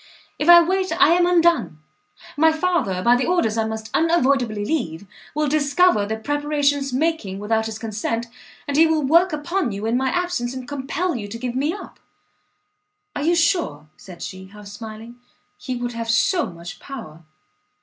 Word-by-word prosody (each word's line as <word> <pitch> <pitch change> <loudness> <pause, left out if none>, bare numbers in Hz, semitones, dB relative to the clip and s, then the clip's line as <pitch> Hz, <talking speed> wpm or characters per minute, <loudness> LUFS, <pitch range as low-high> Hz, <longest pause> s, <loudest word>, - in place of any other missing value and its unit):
If 300 - 0
I 345 0 +10
wait 375 +2 -1
I - - +6
am 350 +1 +4
undone! 340 - +2 0.6
my 320 +2 +4
father, 315 - -1
by 240 +1 +5
the 250 0 0
orders 345 -12 +1
I 225 -1 0
must 220 0 -6
unavoidably 270 -10 +1
leave, 205 - -3 0.3
will 300 0 +1
discover 285 - +2
the 220 +1 -3
preparations 285 +1 0
making 260 -8 -1
without 220 +2 -1
his 220 -1 -6
consent, 225 +1 -3 0.4
and 285 0 -1
he 325 +1 +6
will 315 -2 +1
work 335 +6 +4
upon 310 - -2
you 200 +2 -5
in 225 +2 0
my 260 +1 +1
absence, 350 -9 -2
and 255 -1 -7
compel 290 +5 -2
you 210 -4 -5
to 215 +3 -7
give 245 0 -4
me 280 +5 0
up!" 405 - -9 1.2
"Are - - -3
you 335 +4 +2
sure," 330 - 0
said 180 -3 -11
she, 190 0 -8
half 210 +1 -14
smiling, 220 +3 -10 0.4
"he 255 - -4
would 245 0 -3
have 230 0 -5
so 280 - +2
much 170 +1 -10
power?" 220 - -9
260 Hz, 175 wpm, -22 LUFS, 220-320 Hz, 1.2 s, I